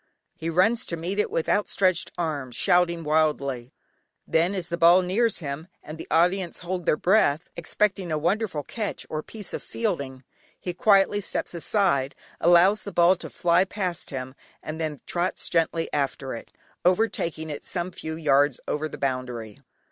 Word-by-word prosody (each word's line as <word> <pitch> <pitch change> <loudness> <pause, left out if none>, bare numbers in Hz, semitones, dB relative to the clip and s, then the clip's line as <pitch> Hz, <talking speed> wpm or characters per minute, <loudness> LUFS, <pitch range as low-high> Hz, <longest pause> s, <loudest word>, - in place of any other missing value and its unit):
He 165 - -4
runs 190 +8 +2
to 170 - -2
meet 180 +5 -3
it 210 - +1
with 165 - -1
outstretched 185 -3 +1
arms, 145 -7 -3
shouting 170 +1 +2
wildly, 140 -5 0 0.5
then, 170 +4 +1
as 180 -3 -3
the 170 - -1
ball 175 +2 +6
nears 215 +5 +1
him, 150 +1 -6 0.2
and 155 +1 -9
the - - -7
audience 180 +1 +1
hold 180 -1 -4
their 150 - +3
breath, 175 -6 +3
expecting 195 -4 -1
a 155 - +1
wonderful 175 -1 -1
catch 215 - -4
or 155 - -2
piece 210 +4 -9
of - - -3
fielding, 140 - -3 0.4
he 180 - -4
quietly 200 +2 +4
steps - - -2
aside, 165 -6 +1 0.2
allows 175 +5 +5
the 200 - -7
ball 175 +1 +5
to - - -6
fly 175 +1 +3
past 185 -3 -3
him, 130 -1 -5 0.3
and 160 +1 -5
then 155 -3 -3
trots 175 +1 -1
gently 165 0 +1
after 140 -2 -2
it, 115 - -8 0.3
overtaking 175 -5 0
it 145 - -6
some 175 0 -2
few 160 -2 -5
yards 145 -4 +2
over 155 +1 -2
the - - -8
boundary. 125 -5 -3
170 Hz, 165 wpm, -25 LUFS, 150-185 Hz, 0.5 s, ball